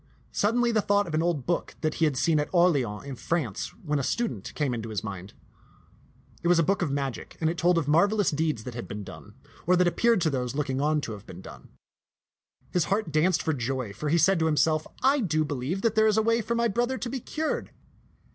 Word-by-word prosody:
Suddenly 235 +3 +2
the 220 -2 +2
thought 205 0 +2
of 165 - -7
an 155 - +2
old 165 -6 -1
book 175 - -2
that 155 -1 0
he - - +6
had 145 -4 0
seen 155 +3 +2
at 150 - -2
Orleans 145 - +2
in 140 -2 -6
France 135 - -2 0.2
when 150 -2 0
a - - -2
student 130 - -2
came 145 -4 0
into 115 -1 -4
his 105 -3 -3
mind. 100 -2 -7 1.1
It 170 - -1
was 175 0 +5
a 165 - +4
book 195 +4 +1
of 170 - 0
magic; 135 -3 -4
and 160 -1 +1
it 170 - -6
told 175 0 +3
of 155 -4 0
marvelous 200 +6 +3
deeds 150 -6 -1
that 125 - -7
had 120 - -6
been 105 0 -6
done, - - -12 0.3
or 180 - +5
that 180 0 +3
appeared 230 +5 +3
to 160 - +2
those 125 -1 -2
looking 140 -2 -1
on 150 +1 +1
to 115 - -5
have 105 -1 -9
been 90 +1 -10
done. - - -12 1.0
His 175 -4 +1
heart 200 -2 -1
danced 155 +4 +2
for 160 - 0
joy, 130 -4 -3
for 150 +8 -4
he 165 - +3
said 190 +1 +4
to 160 - +2
himself, 155 0 +2
" - - -18
I 290 - 0
do 155 - +1
believe 145 +7 -3
that 230 -2 +2
there 220 0 +4
is 215 0 +2
a 220 - +3
way 230 +1 +2
for 235 +2 -2
my 235 0 +2
bro 240 +3 0
ther 260 +1 -3
to 250 - -4
be 265 - -3
cured. 310 +6 -3
160 Hz, 245 wpm, -27 LUFS, 135-195 Hz, 1.1 s, he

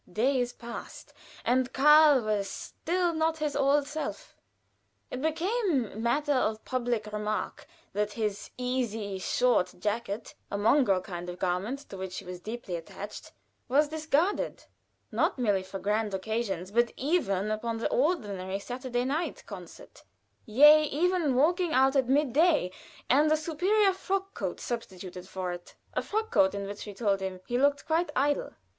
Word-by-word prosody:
Days 245 +4 +1
passed, 235 -1 -9 0.3
and 255 +1 +2
Karl 300 0 +7
was 210 -3 -1
still 350 - -2
not 320 0 +1
his 300 -2 -2
old 280 +1 +3
self. 305 - -5 0.8
It 255 - -4
became 320 - 0
matter 290 +5 +1
of 220 -4 0
public 240 -4 -2
remark 210 -2 -3 0.3
that 210 +1 -1
his 210 -3 -3
easy, 230 -6 -2
short 185 -3 +2
jacket, 210 +2 -3 0.2
a 200 - -2
mongrel 205 -3 +3
kind 175 -2 -6
of 175 - -6
garment 195 +11 -2
to 195 - -8
which 190 -1 -5
he 195 - -7
was 180 0 -7
deeply 215 -1 -5
attached, 200 +5 -9 0.4
was 290 +4 +3
discarded, 315 +4 0 0.5
not - - +1
merely 205 -6 +2
for 190 +1 -7
grand 210 +1 0
occasions, 195 -2 -3
but 235 +2 +2
even 215 - 0
upon 225 +1 -2
the 225 - -2
ordinary 205 - 0
Saturday 245 +3 -3
night 300 +6 -2
concert, - - -11 0.5
yea, 295 +7 +8
even 355 +4 +1
for - - +2
walking 345 +4 +2
out 265 +2 +4
at 260 -2 +2
midday, 295 - +3 0.4
and 295 +4 +4
a 310 - +4
superior 375 +6 +2
frock 390 +1 -2
coat - - -4
substituted 185 -6 -6
for 185 -2 -3
it 175 0 -9 0.2
a - - 0
frock 440 +2 -2
coat 285 - +4
in 200 0 -3
which, 205 +2 -7
we 205 - -6
told 200 -2 +1
him, 190 -1 -4
he 245 +1 -1
looked 285 +1 +2
quite 330 +2 +1
edel. 285 +2 +1
245 Hz, 155 wpm, -29 LUFS, 205-300 Hz, 0.8 s, yea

